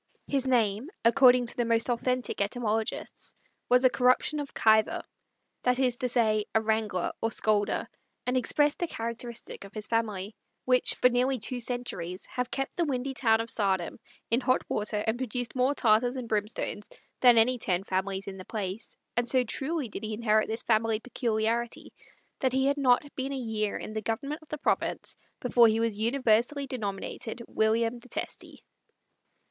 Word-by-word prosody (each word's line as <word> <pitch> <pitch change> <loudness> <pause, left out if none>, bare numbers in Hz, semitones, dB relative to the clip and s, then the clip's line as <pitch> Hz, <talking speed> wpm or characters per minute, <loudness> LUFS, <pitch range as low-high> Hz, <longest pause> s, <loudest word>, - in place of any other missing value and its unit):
His 270 -2 0
name, 230 +1 +1 0.2
according 250 0 +6
to 240 - -4
the 240 - +1
most 230 -1 +2
authentic 250 -1 -1
etymologists, 220 +1 -2 0.3
was 250 +1 +5
a - - +8
corruption 255 +4 +2
of 285 -1 -5
Kyver 220 -1 +3 0.6
that 250 0 +2
is 250 -2 +2
to 250 - -1
say, 220 -3 +2
a - - +6
wrangler 215 -4 0
or 225 - +1
scolder, 210 -2 0 0.4
and 250 - 0
expressed 290 +4 +1
the 345 - 0
characteristic 235 -3 -6
of 200 +2 -13
his 215 -1 -2
family, 215 -3 -2 0.3
which, 255 0 +4
for - - +4
nearly 255 +2 +1
two 245 +3 -1
centuries, 225 -8 -3
have 250 -1 -3
kept 270 0 -3
the 345 - +2
windy 270 -1 -2
town 225 -3 +2
of 230 - -2
Saardam 190 -4 0 0.3
in 235 +3 +3
hot 255 0 +2
water 210 0 -1
and 225 +2 0
produced 245 -1 -3
more 260 +3 +2
tartars 240 +1 +3
and 255 -3 -5
brimstones 210 -1 -3 0.3
than 245 -2 +7
any 245 +2 +4
ten 185 -3 0
families 190 0 -2
in 195 -1 -7
the 185 - -9
place; 205 -1 -5 0.2
and 240 0 +1
so 255 +1 +4
truly 275 +5 -2
did 215 - -7
he 215 0 -3
inherit 215 -1 +2
this 225 +1 -3
family 220 -1 +2
peculiarity, 230 -1 -2 0.5
that 260 -1 +1
he 265 0 +2
had 280 +1 +2
not 255 -2 +4
been 270 +1 -3
a - - -3
year 220 -4 -2
in 215 - -7
the 220 - -2
government 275 +8 -3
of 315 - -19
the 305 - -4
province 300 - -1 0.3
before 240 -1 +5
he 220 0 +2
was 225 -2 -1
universally 240 +3 +2
denominated 225 -1 -5
William 225 +2 +1
the 250 - -17
Testy. - - -7
235 Hz, 175 wpm, -28 LUFS, 215-255 Hz, 0.6 s, a